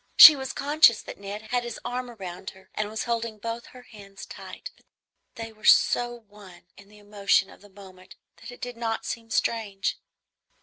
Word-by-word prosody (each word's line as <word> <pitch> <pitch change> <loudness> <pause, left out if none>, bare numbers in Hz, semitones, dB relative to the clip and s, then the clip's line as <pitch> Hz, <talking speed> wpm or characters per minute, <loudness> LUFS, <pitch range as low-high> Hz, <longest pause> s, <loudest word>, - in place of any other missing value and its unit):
She 310 - +12
was 265 -1 -5
conscious 285 -5 +4
that - - -10
Ned 200 +2 -7
had 245 -1 +1
his 240 -2 -6
arm 250 0 -4
round 190 -5 -8
her 190 0 -19
and 215 -1 -3
was 220 +1 -4
holding 230 -2 -3
both 230 +2 -6
her 250 -1 -14
hands 200 -4 -13
tight; - - -10
but - - -30 0.5
they 225 -1 -7
were 215 - -24
so 240 0 +4
one 200 -4 -15
in 200 0 -17
the 210 - -18
emotion 205 -1 0
of - - -17
the 205 - -17
moment 190 -2 -15 0.2
that - - -12
it 245 - -14
did 245 -1 -6
not 225 -1 -3
seem 230 0 -6
strange. 210 -3 -1
220 Hz, 190 wpm, -26 LUFS, 200-240 Hz, 0.5 s, She